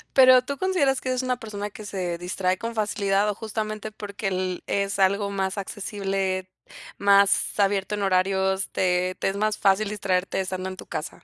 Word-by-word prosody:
Pero, 255 -1 +8
¿tú 280 +1 -4
consideras 330 -9 +1
que 260 - -3
eres 255 0 0
una 250 -1 0
persona 205 -2 -5
que 210 +1 -10
se 180 -4 -3
distrae 185 +1 -1
con 230 +2 -4
facilidad, 205 -1 +1
o 205 - -2
justamente, 215 0 -4
porque 205 -1 -5
el 185 -1 -2
es 200 0 -1
algo 200 +1 +2
más 195 0 -2
accesible, 195 -2 -2 0.5
más 200 0 +3
abierto 200 0 +1
en 205 - -4
horarios, 190 0 +1
te 180 0 +1
te - - +1
es 195 - -4
más 215 0 0
fácil 200 +1 +2
distraerte 190 -2 -1
estando 185 0 -3
en 185 - -8
tu - - -10
casa? - - -6
200 Hz, 180 wpm, -25 LUFS, 190-215 Hz, 0.5 s, Pero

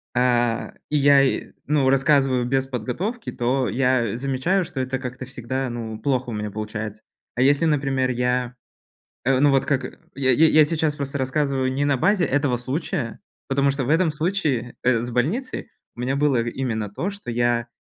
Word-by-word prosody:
э, 120 -2 +1 0.2
и 150 - +1
я, 140 0 +6
и, 135 - 0
ну, 140 -2 +2
рассказываю 135 -2 +3
без 135 +1 +1
подготовки, 160 - -4
то 125 +2 0
я 125 -4 +1
замечаю, 140 +9 0
что 155 -5 -6
это 130 0 -2
как-то 125 0 -6
всегда, 130 +1 -4
ну, 115 -2 -5
плохо 130 -3 -1
у - - -4
меня 105 -1 -4
получается. 110 0 -5 0.3
А 125 - 0
если, 145 +4 +4
например, 135 -4 +1
я, 125 0 -1 0.7
э, 130 0 +3
ну 145 -1 +5
вот 135 -1 +3
как, 135 -3 0 0.3
я 130 -1 +1
я 160 +6 +5
я 155 -1 +6
сейчас 155 -1 -1
просто 140 0 -4
рассказываю 130 0 0
не 140 +2 0
на 140 -2 +2
базе 195 +3 +3
этого 140 -3 +1
случая, 130 +1 -3 0.3
потому 140 +1 +2
что 135 -1 -2
в - - -5
этом 165 0 +3
случае, 150 - -1
э, 120 -3 +3
с 120 +1 -4
больницей 170 - -2 0.3
у - - -8
меня 130 +3 -1
было 140 -5 +2
именно 115 -3 -3
то, 175 - -3
что 200 -11 -8
я, 120 0 +1
130 Hz, 180 wpm, -23 LUFS, 120-145 Hz, 0.7 s, я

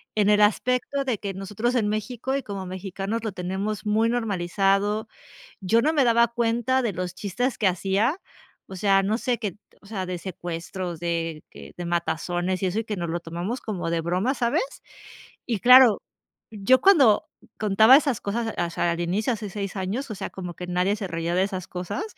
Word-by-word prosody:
En 210 -1 +3
el 210 0 +5
aspecto 250 +6 +1
de 255 -5 -1
que 200 -1 -5
nosotros 205 +6 -2
en 215 -4 +1
México 240 +5 -2
y 275 - -4
como 195 -2 -6
mexicanos 195 +4 -4
lo 215 - -3
tenemos 190 +4 -3
muy 215 +2 +2
normalizado, 205 -1 0 0.5
yo 220 +4 +2
no 310 - +2
me 295 -3 +3
daba 235 -1 +4
cuenta 235 +2 +1
de 230 -4 -1
los 180 0 -4
chistes 225 +8 -2
que 210 - +1
hacía, 195 - 0 0.5
o 190 - -9
sea, 195 0 +3
no 210 +4 0
sé, 245 -2 -1
que 205 -6 -4 0.3
o 200 - -17
sea, 195 -3 -4
de 180 0 -3
secuestros, 175 0 -5
de 165 -2 -3
que - - -12
de 175 - -5
matazones 175 +2 -1
y - - +2
eso, 185 +4 -1
y 225 - -1
que 210 -2 -4
nos 170 -2 -3
lo 170 +1 -2
tomamos 175 +9 -4
como 185 -6 -4
de 170 0 0
broma, 180 +9 0
¿sabes? 240 - +1 0.8
Y 230 -5 -1
claro, 250 -2 +8 0.5
yo 225 +4 +3
cuando 285 - +5 0.3
contaba 220 +4 +6
esas 280 -6 +1
cosas, 225 +2 -2
o 175 -1 0
sea, 170 0 0
al 170 - -4
inicio 195 +8 0
hace 210 -2 -6
6 200 0 -5
años, 205 +8 -3
o - - -3
sea, 195 - -5
como 180 -2 -7
que 180 - -7
nadie 180 +3 +1
se 205 - -4
reía 165 0 -2
de 185 - +3
esas 185 -3 -5
cosas, 180 - -4
200 Hz, 195 wpm, -25 LUFS, 180-230 Hz, 0.8 s, claro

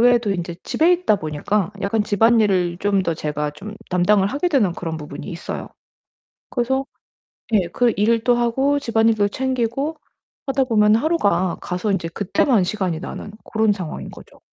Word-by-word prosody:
외에도 240 -3 +4
인제 175 -2 -4
집에 335 +3 +3
있다 350 - +2
보니까 175 +5 -2
약간 205 +2 0
집안일을 205 -5 +2
좀 200 -1 +1
더 165 -3 -1
제가 150 -1 -3
좀 205 +9 -9
담당을 190 +2 +3
하게 290 +8 -1
되는 250 - +2
그런 165 -2 -5
부분이 150 -1 -8
있어요. 170 -2 -6 0.8
그래서 265 +2 0 0.7
예. 190 -5 +3
그 235 +6 +1
일도 230 +3 +3
하고 265 +4 +1
집안일도 225 -4 +2
챙기고 260 +5 -2 0.5
하다 270 0 +2
보면 215 -3 +4
하루가 200 - +1
가서 180 +4 -2
인제 190 -4 -1
그때만 200 - +1
시간이 180 -4 -2
나는 205 - -7
그런 220 -1 +1
상황인 180 -6 -6
거죠. - - -14
210 Hz, 330 characters per minute, -21 LUFS, 180-240 Hz, 0.8 s, 외에도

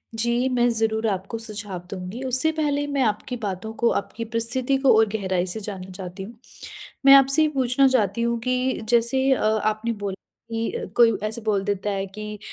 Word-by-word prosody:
जी, 235 +3 +1
मैं 245 -1 +2
ज़रूर 225 -1 0
आपको 195 +2 -3
सुझाव 205 -4 -6
दूँगी। 190 +5 -6
उससे 260 +5 +3
पहले 290 -2 0
मैं 280 -1 -1
आपकी 220 +3 -2
बातों 205 -1 -5
को, 235 +1 +1
आपकी 230 +3 -3
परिस्थिति 240 +4 -1
को 265 -2 +4
और 220 - +5
गहराई 190 -4 -1
से 200 +5 -2
जानना 195 -3 -7
चाहती 185 0 -8
हूँ। 225 - -10 0.7
मैं 275 - +9
आपसे 275 +3 +5
ये 310 - +4
पूछना 265 -1 +2
चाहती 230 -4 +1
हूँ 235 0 0
कि 255 -1 0
जैसे 260 +3 +2
अ, - - -2
आपने 215 +1 0
बोला 205 -3 -4 0.4
कि 225 0 -2
अ, - - -4
कोई 230 -1 +6
ऐसे 220 +2 -1
बोल 210 -3 0
देता 205 0 -2
है 195 -1 -2
कि 210 +2 -8
225 Hz, 190 wpm, -23 LUFS, 205-250 Hz, 0.7 s, मैं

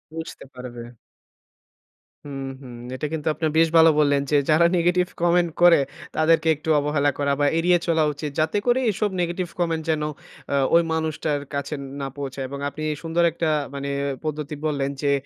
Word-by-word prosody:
বুঝতে 160 0 -7
পারবে। 125 -2 -8 1.4
হুম, 140 -1 -6 0.2
হুম, 125 -3 -10 0.2
এটা 140 - -4
কিন্তু 155 -1 -4
আপনারা 155 0 -1
বেশ 165 - +5
ভালো 165 0 +8
বললেন 145 -1 +3
যে, - - +3
যারা 160 +2 +5
নেগেটিভ 180 +1 +2
কমেন্ট 175 0 +3
করে 175 -3 +7 0.4
তাদেরকে 165 +1 +3
একটু 155 +2 -7
অবহেলা 145 0 +1
করা 140 0 +1
বা 145 - +3
এড়িয়ে 175 +1 +4
চলা 160 -2 +3
উচিত। 150 0 -5
যাতে 160 +6 +1
করে 245 +1 +3
এসব 205 +2 -1
নেগেটিভ 175 +1 -2
কমেন্ট 165 -2 0
যেন 155 -1 +1 0.5
অ্যা 140 - +1 0.2
ওই 170 - +7
মানুষটার 155 -2 -1
কাছে 140 +1 -3 0.3
না 135 - -2
পৌঁছায় 135 -1 -4
এবং 140 0 -6
আপনি 155 - -8 0.2
সুন্দর 165 +1 +1
একটা 165 0 -1 0.3
মানে 140 0 -4 0.4
পদ্ধতি 150 -1 -3
বললেন, 140 -3 0
যে, 145 - +2
155 Hz, 170 wpm, -23 LUFS, 140-165 Hz, 1.4 s, ভালো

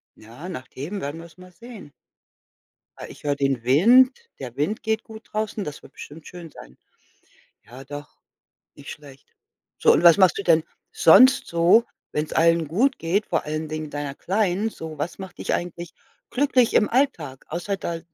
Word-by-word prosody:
ja, 120 +12 -11
nach 130 -7 -7
dem 175 +10 -6
werden 145 +3 -5
wir 165 - -10
es 170 - -23
mal 180 0 -15
sehen. 215 -4 -13 1.1
Ah, - - -9
ich - - -14
höre 145 -1 +1
den 135 -4 -1
Wind, 250 - +4
der 125 -2 -8
Wind 155 +10 -2
geht 220 0 -2
gut 220 0 -12
draußen, 215 -1 -3
das 150 0 -8
wird - - -15
bestimmt 150 +2 -12
schön 175 -3 -10
sein. 65 - -15 0.9
Ja, 130 +3 -13
doch, 145 +1 -10 0.6
nicht 140 - -12
schlecht. 140 -3 -14 0.5
So, - - +4
und - - +2
was 170 -2 +8
machst 185 -3 +4
du 200 - -4
denn 165 -2 +3 0.3
sonst 255 +11 +6
so, 170 +7 +4 0.3
wenn's 150 +1 -3
allen 165 -1 +2
gut 255 - +1
geht, 190 +6 -1
vor - - -1
allen 155 +1 -4
Dingen 155 0 -5
deiner 145 -1 -5
Kleinen 200 +2 -1
so? 160 -6 -9
Was 150 +7 -5
macht 190 -1 -10
dich - - -3
eigentlich 175 -1 -5 0.4
glücklich 255 -3 +2
im 210 - +4
Alltag, 175 - -1
außer 175 +5 -3
da 170 -3 -5
170 Hz, 180 wpm, -23 LUFS, 145-210 Hz, 1.1 s, was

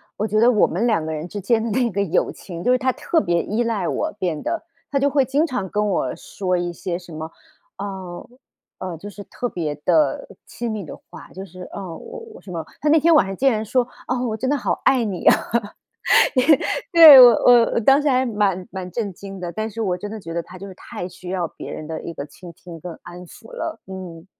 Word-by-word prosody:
我 210 - -2
觉 215 0 +1
得 235 +2 +6
我 215 - +4
们 210 +9 -1
两 210 -9 +1
个 160 - -3
人 155 +2 -5
之 205 +3 -6
间 220 +3 +1
的 230 - -2
那 235 +2 0
个 200 +1 -1
友 180 - 0
情 170 -2 -9
就 250 - +2
是 255 - +4
她 260 0 +1
特 325 +5 0
别 170 - 0
依 220 +4 -1
赖 215 -7 -1
我 315 - -2
变 175 -7 -3
得。 335 - -3 0.3
她 280 - 0
就 275 +1 +2
会 280 -1 +3
经 285 +5 +1
常 250 - -3
跟 210 +2 0
我 130 -9 -1
说 185 -2 -3
一 175 0 -2
些 175 +1 -4
什 175 -1 -13
么 160 +1 -6 0.5
呃， 190 -3 -7 0.5
呃， 180 -3 -5
就 195 - -10
是 205 0 -10
特 245 - -4
别 155 -4 -3
的 310 - +2 0.2
亲 235 -1 -5
密 215 -2 -4
的 - - -8
话， - - -12
就 190 +2 -7
是 185 0 -13
哦， 185 -4 -6
我 - - -9 0.2
我 - - -13
什 190 - -14
么， 165 -3 -5 0.2
她 300 - -1
那 315 - +6
天 335 +3 +4
晚 245 -11 +5
上 195 - -5
竟 270 +4 +3
然 215 -2 -1
说： 245 +3 +1 0.2
“哦， 250 0 -1
我 220 -2 -2
真 260 +3 -2
的 290 - +2
好 250 - -2
爱 260 -3 +4
你 195 -5 -4
啊。” - - +7 1.6
对， 320 -6 +11
我 250 - +11 0.2
我 240 -2 +6
我 - - +2
当 270 +5 +5
时 295 - +1
还 260 -1 +2
蛮 205 -5 0
蛮 185 -1 -6
震 205 -1 -3
惊 195 +2 -10
的， 175 -2 -5
但 215 +3 -3
是 225 +1 -5
我 180 -4 -1
真 205 +2 -6
的 220 - -6
觉 165 -5 -8
得 170 0 -2
她 185 - -13
就 195 - -8
是 195 - -9
太 175 - -7
需 180 0 -12
要 180 -2 -1
别 - - -10
人 155 - -7
的 160 - -5
一 170 - -7
个 140 - -5
倾 170 +4 -13
听 170 -1 -12
跟 175 0 -8
安 175 +1 -10
抚 335 - -15
了， 330 -10 -5
嗯， 180 -3 -9
200 Hz, 265 characters per minute, -21 LUFS, 175-245 Hz, 1.6 s, 对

